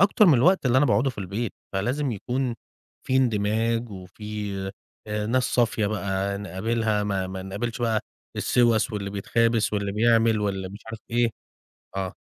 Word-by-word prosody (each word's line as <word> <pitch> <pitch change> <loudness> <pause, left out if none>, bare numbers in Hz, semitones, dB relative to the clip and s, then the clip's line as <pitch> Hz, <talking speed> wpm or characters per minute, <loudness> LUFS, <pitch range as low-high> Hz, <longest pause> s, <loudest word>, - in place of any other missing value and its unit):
أكتر 200 +1 +5
من 155 - +7
الوقت 165 +4 +4
اللي 125 +1 +4
أنا 145 - +4
باقعدُه 135 +1 +3
في 120 - -14
البيت، 100 +4 -3 0.2
فلازم 125 +8 0
يكون 125 +4 -2 0.5
فيه 130 - +2
اندماج 115 0 +1
وفيه 100 +1 -5 0.4
آآ، 105 0 -2
ناس 125 +2 +2
صافية 115 -3 +1
بقى 100 -1 -1
نقابلها 105 +3 -1
ما 95 -2 -1
ما 95 0 -6
نقابلش 105 +6 -4
بقى 110 -2 +2 0.4
السوَس 120 -1 +3
واللي 100 -1 -3
بيتخابث 115 +2 +1
واللي 100 -1 -1
بيعمل 115 0 +3
واللي 95 -2 -2
مش 100 +3 -10
عارف 110 0 -6
إيه، 120 0 +2 0.7
آه. 95 -1 -3
110 Hz, 155 wpm, -25 LUFS, 100-120 Hz, 0.7 s, من